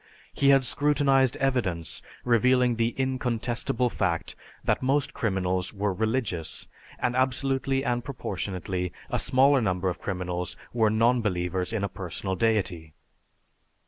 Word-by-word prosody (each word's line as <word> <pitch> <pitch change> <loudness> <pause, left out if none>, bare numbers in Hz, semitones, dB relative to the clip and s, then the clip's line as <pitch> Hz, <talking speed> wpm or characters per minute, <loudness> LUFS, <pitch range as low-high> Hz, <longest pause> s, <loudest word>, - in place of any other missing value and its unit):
He 140 - +3
had 135 -1 +5
scrutinized 135 -2 +2
evidence 105 - -1 0.2
revealing 125 +1 +3
the 115 0 0
incontestable 125 -2 -1
fact 85 -4 -1 0.3
that - - +1
most 135 +2 +1
criminals 95 -3 -1
were 100 0 0
religious, 110 -5 -2 0.3
and 125 0 -1
absolutely 135 +1 +1
and 120 -2 0
proportionately, 95 -7 -4 0.2
a - - +1
smaller 135 +1 +4
number 95 -3 0
of 90 - -5
criminals 90 -2 -3 0.2
were 110 -2 +3
non 115 +3 +3
believers 90 -2 -1
in 110 -3 -2
a - - +1
personal 95 0 -4
deity. 90 -7 0
115 Hz, 125 wpm, -27 LUFS, 95-130 Hz, 0.3 s, had